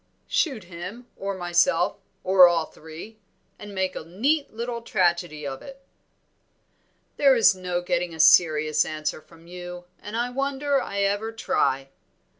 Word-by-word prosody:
"Shoot 265 - 0
him 180 +7 -9
or 195 0 -4
myself, 175 0 +2 0.3
or 185 -1 +7
all 170 -2 +1
three, 160 +10 -12 0.4
and 205 0 -9
make 190 -1 -2
a - - -5
neat 270 - 0
little 235 +1 -5
tragedy 175 -7 0
of 135 -1 -5
it." 275 0 -13 1.3
"There 275 -2 +5
is 230 -4 +6
no 180 -1 -3
getting 175 0 -1
a - - -12
serious 155 -1 +5
answer 155 0 -4
from 165 +1 -19
you, 180 0 -9
and 210 +2 -6
I 240 +1 -1
wonder 275 +1 0
I 200 0 -3
ever 205 +3 0
try. 135 -11 -1
185 Hz, 145 wpm, -25 LUFS, 170-230 Hz, 1.3 s, or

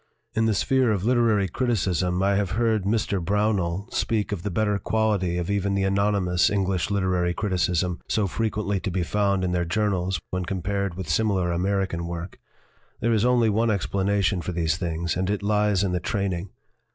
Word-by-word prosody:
In 110 0 +1
the 110 - +2
sphere 130 0 +2
of 100 -3 -1
literary 115 -4 +3
criticism 95 -5 0
I 100 +1 +3
have 100 -2 0
heard 110 -4 +1
Mr. 100 -3 0
Brownell 100 -1 0
speak 110 -3 -1
of 100 -5 -3
the 105 - -3
better 105 +2 0
quality 105 -6 0
of 90 +2 -2
even 100 -1 0
the 100 - +1
anonymous 95 -2 +2
English 95 -3 0
literary 90 -3 0
criticism 90 -3 0
so 110 - +1
fre 115 +4 -1
quently 105 -3 -1
to 95 - -2
be 90 0 -1
found 100 0 +1
in 90 - 0
their 90 -1 +1
journals 95 -1 0
when 90 0 -1
com 90 -1 -4
pared 100 -2 -1
with 95 -3 -6
similar 95 0 +1
American 90 -1 -1
work. 85 +1 -6 0.6
There 115 +1 +1
is 110 -1 +2
only 120 -3 +3
one 115 +3 +1
explanation 100 -1 0
for 90 +2 -4
these 80 -2 0
things, 85 -1 -2
and 90 +1 -1
it 105 -1 -1
lies 105 -2 +2
in 95 - 0
the 90 - 0
training. 95 0 -2
100 Hz, 190 wpm, -25 LUFS, 90-105 Hz, 0.6 s, literary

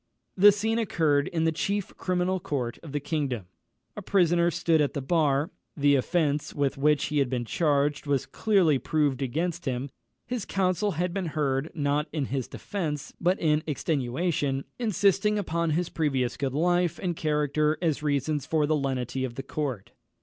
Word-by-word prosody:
The 205 +2 +8
scene 220 +3 0
occurred 155 -9 +1
in 165 -2 -1
the 160 - +3
chief 200 +4 -2
criminal 185 0 0
court 125 -8 -3
of 160 - -10
the 145 - -1
kingdom. 140 - -2 0.5
A - - -5
prisoner 175 -3 +3
stood 165 -1 +2
at 145 - 0
the - - 0
bar; 150 +2 +1 0.3
the 145 0 +4
offence 145 +1 0
with 140 -2 0
which 145 +1 +2
he 150 0 0
had 135 -3 +1
been 120 -2 -2
charged 145 +1 +1
was 140 -3 +1
clearly 185 -10 +2
proved 145 -3 0
against 165 +6 -2
him; 130 0 -2 0.3
his 245 -3 -3
counsel 195 +2 0
had 175 +2 -1
been 190 -3 -2
heard, 140 0 0
not 145 0 0
in 150 -3 -1
his 130 -3 -1
defence, 160 -8 -4
but 180 +2 +2
in 150 -1 +2
extenuation, 140 -1 -1 0.2
insisting 210 -1 +2
upon 170 -4 -1
his 170 +3 0
previous 135 -6 0
good 135 -1 -2
life 175 +1 +2
and 175 -3 -2
character 150 0 +1
as 160 -4 0
reasons 145 -1 -1
for 155 -2 +2
the 155 +1 +2
lenity 130 -2 -2
of 125 -2 -4
the 135 - -5
court. 135 -7 -4
150 Hz, 170 wpm, -27 LUFS, 140-175 Hz, 0.5 s, The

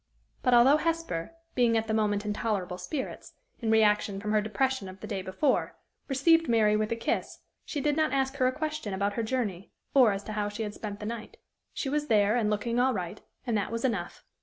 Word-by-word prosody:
But, 250 -1 +4
although 260 +5 +7
Hesper, 330 - -2 0.2
being 235 -2 +3
at 225 - 0
the 220 - -2
moment 210 -1 +1
in 210 - -1
tolerable 200 -5 -2
spirits, 280 -4 -5 0.3
in 225 - -2
reaction 210 -2 +3
from 210 +1 -3
her 215 0 +3
depression 215 0 -1
of 185 +1 -11
the - - -7
day 205 -3 -3
before, 190 +10 0 0.3
received 325 +3 +3
Mary 215 -2 +4
with 215 +1 0
a - - +1
kiss, 230 - -2 0.3
she 290 - -3
did 295 +1 +1
not 310 -2 +2
ask 270 0 0
her 255 -2 +3
a - - +2
question 305 -8 -3
about 200 +1 0
her 230 - -1
journey, 220 -6 -2 0.2
or 255 -6 +6
as 195 0 -3
to - - -7
how 210 -1 -1
she 205 +2 -4
had 210 -1 -4
spent 205 -1 -6
the - - -4
night. 230 0 -6 0.3
She - - -4
was 295 +2 -1
there, 210 -2 +4
and 225 -3 +1
looking 230 +3 0
all 255 +1 +3
right, 175 -3 -5 0.2
and 235 -3 0
that 200 - -3
was 230 +2 -2
enough. 200 -9 -2
220 Hz, 225 wpm, -28 LUFS, 205-265 Hz, 0.3 s, although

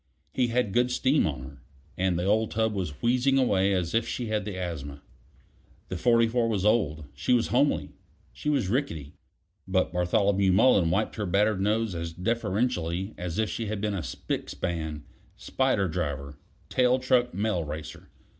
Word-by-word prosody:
He 125 -2 +2
had 120 -4 0
good 125 +3 +3
steam 130 - +2
on 70 -4 -4
her, 65 - -12 0.3
and 90 -1 0
the 90 - -1
old 110 +2 +2
tub 110 0 0
was 90 -6 -4
wheezing 125 +3 +3
away 100 -7 +3
as 90 -3 -1
if 115 +1 +1
she 125 - -3
had 105 -2 -1
the 100 -3 -5
asthma. 70 -6 -5 0.9
The 95 - -3
44 115 +3 +3
was 100 -3 -1
old; 80 -9 +1
she 75 - 0
was 120 -2 +2
homely; 140 +4 +1 0.4
she 150 - -3
was 135 -9 +1
rickety; 85 - -2 0.5
but 95 -1 +1
Bartholomew 95 +2 +2
Mullen 95 -4 +5
wiped 100 +6 0
her 105 -2 -2
battered 100 +2 +2
nose 110 +1 +1
as 85 -1 -4
deferentially 100 -2 -1
as 90 0 -5
if 110 0 +1
she 115 - -3
had 105 0 -3
been 105 0 -1
a 95 - -2
spick - - -4
span, 80 -4 -4 0.3
spider 130 -7 0
driver, 70 -4 -4 0.3
tail 125 0 +3
truck 125 -1 +1
mail 100 -4 0
racer. 75 +1 -8
100 Hz, 170 wpm, -27 LUFS, 85-115 Hz, 0.9 s, Mullen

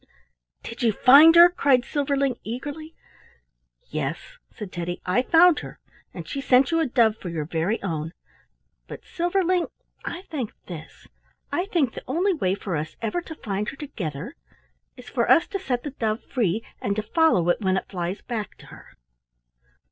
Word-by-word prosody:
"Did 230 +1 -8
you 235 -2 +3
find 290 +9 +8
her?" 340 +1 +10
cried 275 -8 +2
Silverling, 275 -3 -1
eagerly. 290 +7 -6 1.0
"Yes," - - -2 0.3
said 205 -3 -8
Teddy, 175 0 -4
"I 185 +7 +2
found 335 +3 +5
her, - - -10 0.3
and - - -9
she 275 - -4
sent 265 +2 +4
you 330 - +2
a 320 - +1
dove 230 -3 +3
for 180 - -7
your 160 -3 -3
very 165 +7 -1
own; 160 -4 -3 0.8
but, - - -10
Silverling, 355 0 0 0.4
I 350 +2 -6
think 270 - -5
this. 165 -4 -10 0.4
I 355 - 0
think 310 - 0
the - - -8
only 355 +9 +1
way 190 - 0
for 195 -3 -4
us 155 +1 -4
ever 230 +10 -2
to 325 -2 -9
find 205 -5 -3
her 275 - -10
together 185 - -6 0.6
is 250 -1 -13
for 235 -2 -1
us 330 - +6
to 395 - -3
set 250 -9 -2
the 290 - -5
dove 220 -3 -2
free, 225 -3 -1 0.2
and 200 - -1
to 215 - -2
follow 320 - +2
it 175 - +1
when 190 -1 +1
it - - -4
flies 180 +1 -4
back 220 -4 -5
to - - -16
her." - - -16
245 Hz, 175 wpm, -24 LUFS, 195-315 Hz, 1.0 s, her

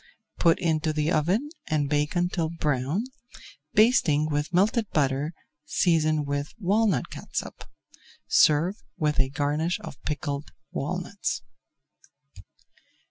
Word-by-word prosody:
Put 165 -1 +4
into 160 -2 0
the 150 +2 0
oven 185 - +1 0.2
and 150 -2 +1
bake 150 +3 0
until 175 -2 0
brown, 150 - -1 0.7
basting 175 - +4
with 145 +2 -1
melted 210 +5 +2
butter 140 0 +1 0.3
seasoned 155 -3 +2
[Page 145 0 -2
335] - - -41
with 200 -6 -8
walnut 205 - +2
catsup. - - -6 0.6
Serve 165 +7 +4 0.2
with 150 -4 0
a 135 -1 +3
garnish 150 +5 0
of 140 - -9
pickled 145 -1 -3 0.2
walnuts. 180 +7 -3
155 Hz, 115 wpm, -26 LUFS, 145-180 Hz, 0.7 s, Put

